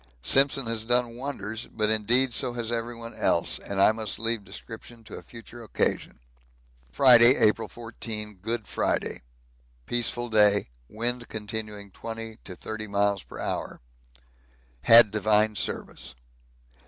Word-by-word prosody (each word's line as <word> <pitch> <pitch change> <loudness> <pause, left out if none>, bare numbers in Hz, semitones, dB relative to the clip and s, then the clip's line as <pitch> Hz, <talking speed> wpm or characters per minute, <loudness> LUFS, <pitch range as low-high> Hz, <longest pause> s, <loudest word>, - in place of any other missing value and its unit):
Simpson 135 - +3
has 115 -1 -2
done 120 0 0
wonders, 115 -4 -6
but 110 -1 -1
indeed 120 +4 +3
so 120 - -1
has 120 -1 -4
everyone 115 0 -4
else, - - +1
and 100 -1 -5
I 100 - +6
must 110 -2 -4
leave 115 -1 0
description 115 +3 -11
to - - -13
a - - -9
future 120 0 -12
occasion. 110 - -2 0.7
Friday, 125 - +7
April 110 -1 +2
14. 110 -3 -7
Good 115 +4 -4
Friday. - - -2 0.6
Peaceful 120 - -2
day. 105 - +3 0.2
Wind 120 +2 -2
continuing 105 -2 -6
20 115 +1 -8
to 90 - -8
30 110 +3 -6
miles 100 -1 0
per - - -12
hour. - - -4 1.1
Had 115 -2 +8
divine 105 0 +2
service. 60 - -4
115 Hz, 130 wpm, -26 LUFS, 105-120 Hz, 1.1 s, Had